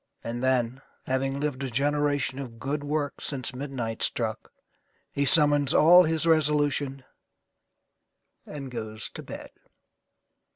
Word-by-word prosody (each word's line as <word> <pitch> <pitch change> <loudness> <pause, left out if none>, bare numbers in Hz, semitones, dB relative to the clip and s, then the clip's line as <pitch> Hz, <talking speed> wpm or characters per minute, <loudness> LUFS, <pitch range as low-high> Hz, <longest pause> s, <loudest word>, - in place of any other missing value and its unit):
And 120 +1 -4
then, 130 0 +1 0.2
having 135 +1 -1
lived 145 -2 -2
a 135 - -3
generation 145 0 0
of 120 -4 -7
good 145 +4 -3
works 145 -1 -3
since 135 -2 -2
midnight 125 -4 -5
struck, - - -2 0.6
he 140 - 0
summons 145 -1 +4
all 175 +3 +7
his 160 0 0
resolution 145 -4 +1 1.4
and 140 -3 -8
goes 110 -2 -3
to - - -8
bed. - - -9
140 Hz, 120 wpm, -27 LUFS, 130-145 Hz, 1.4 s, all